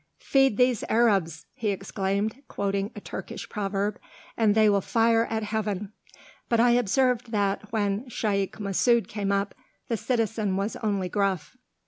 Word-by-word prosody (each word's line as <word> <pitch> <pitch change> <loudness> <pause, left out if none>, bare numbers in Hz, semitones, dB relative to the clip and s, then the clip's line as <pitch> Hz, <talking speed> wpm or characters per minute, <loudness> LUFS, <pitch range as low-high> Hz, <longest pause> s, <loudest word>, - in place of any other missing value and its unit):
"Feed 270 -6 +2
these 250 -3 +3
Arabs," 195 -9 +2
he 230 -5 -2
exclaimed, 200 +4 -2
quoting 200 0 -2
a - - -6
Turkish - - -7
proverb, 200 0 -2 0.4
"and 215 -2 +3
they 220 -1 +5
will 200 -1 +3
fire 230 +2 +3
at 220 -1 -1
Heaven!" 210 -1 -3 0.6
But 235 - +2
I 240 +1 +5
observed 245 +1 +2
that, 205 -1 -1
when 210 +2 -1
Shaykh 200 -4 -1
Masud 215 +4 +2
came 200 -2 -2
up, 200 0 0 0.4
the 230 - 0
citizen 220 -5 0
was 200 +3 -2
only 200 -4 -1
gruff. 195 0 -1
210 Hz, 145 wpm, -26 LUFS, 200-230 Hz, 0.6 s, they